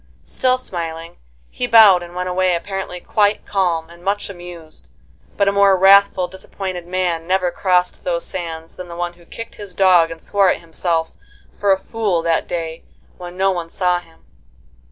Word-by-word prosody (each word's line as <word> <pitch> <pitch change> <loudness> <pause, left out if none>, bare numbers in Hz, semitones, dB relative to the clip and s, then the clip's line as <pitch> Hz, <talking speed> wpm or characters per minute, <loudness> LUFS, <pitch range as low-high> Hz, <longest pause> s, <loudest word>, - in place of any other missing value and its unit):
Still 255 0 +1
smiling, 170 -7 -5 0.3
he - - -3
bowed 215 -5 +7
and 175 0 -10
went 180 0 -3
away 180 0 +1
apparently 190 0 -5
quite 205 +2 +1
calm 175 -5 0
and 170 0 -16
much 200 +1 -2
amused, 175 -3 -12 0.5
but 200 - +2
a - - +4
more 200 -1 +4
wrathful, 195 -1 +5
disappointed 185 -1 -6
man 175 -2 -1
never 185 -1 +1
crossed 180 0 0
those 170 -1 -2
sands 165 -2 -7
than 180 - -8
the 170 - -9
one 175 0 -3
who 170 0 -21
kicked 230 0 -9
his 200 -4 -10
dog 180 -3 +5
and 165 0 -8
swore 200 +2 +2
at - - -2
himself 165 0 -2 0.4
for 200 -1 +1
a 190 - +4
fool 195 -4 -2
that 165 -1 0
day 165 -1 -5 0.4
when 175 0 -9
no 195 +1 +2
one 170 -3 -4
saw 180 0 +1
him. 165 -2 -21
180 Hz, 175 wpm, -19 LUFS, 170-195 Hz, 0.5 s, bowed